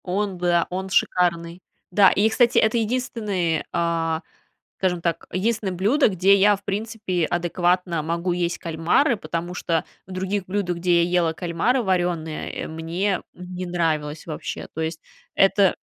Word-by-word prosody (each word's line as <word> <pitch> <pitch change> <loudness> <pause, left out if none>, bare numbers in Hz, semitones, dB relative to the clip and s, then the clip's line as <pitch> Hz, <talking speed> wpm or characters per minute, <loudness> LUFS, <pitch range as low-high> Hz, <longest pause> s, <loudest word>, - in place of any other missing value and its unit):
Он, 195 +1 -1
быа 175 -1 +2
он 190 +1 -4
шикарный. 175 -2 +1 0.3
Да, 195 +1 +6
и, 210 +2 +3
кстати, 240 +1 +3
это 220 +2 +4
единственный, 215 -8 -1
а, 165 -1 0 0.6
скажем 180 -2 0
так, 170 0 -2
единственное 210 0 0
блюдо, 210 - +3
где 190 0 +4
я, 205 +1 +5
в 200 - -19
принципе, 205 -4 -2
адекватно 175 0 0
могу 170 +3 -1
есть 175 -1 -1
кальмары, 170 - +1
потому 170 0 -4
что 165 -2 -1 0.2
в 190 - -10
других 190 +1 -2
блюдах, 185 -2 -1
где 175 0 +3
я - - -2
ела 175 -2 +2
кальмары 175 +10 0
варёные, 175 -5 -1
э, - - -5
мне 170 +5 -2
не 180 0 -7
нравилось 160 -3 -1
вообще. 155 -2 -5
То 160 - -4
есть 160 0 -3 0.4
это, 195 0 +4
180 Hz, 150 wpm, -23 LUFS, 170-200 Hz, 0.6 s, Да